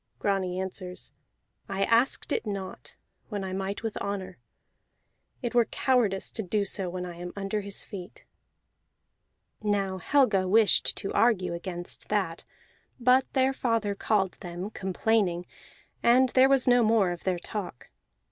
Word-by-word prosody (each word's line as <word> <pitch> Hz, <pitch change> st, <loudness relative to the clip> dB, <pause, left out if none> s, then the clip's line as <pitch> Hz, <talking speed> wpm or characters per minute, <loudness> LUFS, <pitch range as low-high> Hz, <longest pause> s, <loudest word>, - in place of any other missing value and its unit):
Grani 190 Hz, -2 st, -1 dB
answers: 185 Hz, -1 st, -6 dB, 0.6 s
"I 195 Hz, 0 st, 0 dB
asked 230 Hz, +5 st, +2 dB
it -, -, -1 dB
not 195 Hz, -2 st, -6 dB, 0.3 s
when 205 Hz, -3 st, -3 dB
I 190 Hz, -1 st, -4 dB
might 195 Hz, +3 st, -3 dB
with 225 Hz, -2 st, -3 dB
honor; 200 Hz, -2 st, -4 dB, 1.0 s
it 240 Hz, -, -2 dB
were 240 Hz, -1 st, +5 dB
cowardice 230 Hz, -8 st, +1 dB
to 220 Hz, -, -3 dB
do 205 Hz, +1 st, 0 dB
so 190 Hz, -2 st, -2 dB
when 180 Hz, 0 st, -4 dB
I 175 Hz, -1 st, -8 dB
am 175 Hz, 0 st, -6 dB
under 200 Hz, +1 st, -2 dB
his 200 Hz, 0 st, -3 dB
feet." 185 Hz, -3 st, -10 dB, 1.4 s
Now 200 Hz, -3 st, 0 dB
Helga 205 Hz, -, +3 dB
wished 215 Hz, +2 st, +4 dB
to 195 Hz, -, -3 dB
argue 190 Hz, -7 st, +2 dB
against 175 Hz, 0 st, -5 dB
that; 190 Hz, -6 st, -1 dB, 0.5 s
but 255 Hz, +2 st, +3 dB
their 265 Hz, 0 st, +3 dB
father 230 Hz, -5 st, 0 dB
called 200 Hz, -2 st, 0 dB
them, 180 Hz, +2 st, -6 dB
complaining, 190 Hz, -2 st, 0 dB, 0.6 s
and 250 Hz, +2 st, +5 dB
there 260 Hz, +2 st, +5 dB
was 270 Hz, -2 st, +3 dB
no 245 Hz, 0 st, +6 dB
more 215 Hz, -5 st, +3 dB
of 175 Hz, -, -6 dB
their 185 Hz, -2 st, 0 dB
talk. 180 Hz, -, -6 dB
200 Hz, 145 wpm, -28 LUFS, 185-225 Hz, 1.4 s, no